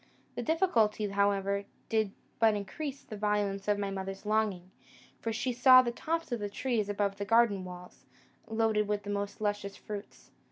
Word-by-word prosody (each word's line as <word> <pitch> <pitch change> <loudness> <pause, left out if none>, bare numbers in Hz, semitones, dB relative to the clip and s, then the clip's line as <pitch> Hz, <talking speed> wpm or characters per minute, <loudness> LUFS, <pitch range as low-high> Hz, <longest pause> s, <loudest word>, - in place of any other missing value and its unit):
The - - -4
difficulty, 230 - +2
however, 200 0 +1 0.2
did 220 -3 +1 0.3
but 225 -2 +5
increase 275 +7 -5
the 215 - -8
violence 205 -1 -1
of 205 -1 +3
my 200 -1 -2
mother's 195 +1 -5
longing; 210 -4 0 0.5
for 230 - -2
she 250 +3 -1
saw 255 +1 +8
the 240 - -1
tops 325 +5 -3
of 240 - -1
the 205 -1 -3
trees 220 -1 -1
above 200 -1 0
the 200 - -3
garden 225 -2 +3
walls, 180 0 -11 0.4
loaded 220 -1 +1
with 205 -1 -1
the 205 - -4
most 205 +1 -3
luscious 205 -1 -2
fruits. 205 -1 -9
210 Hz, 170 wpm, -31 LUFS, 200-225 Hz, 0.5 s, saw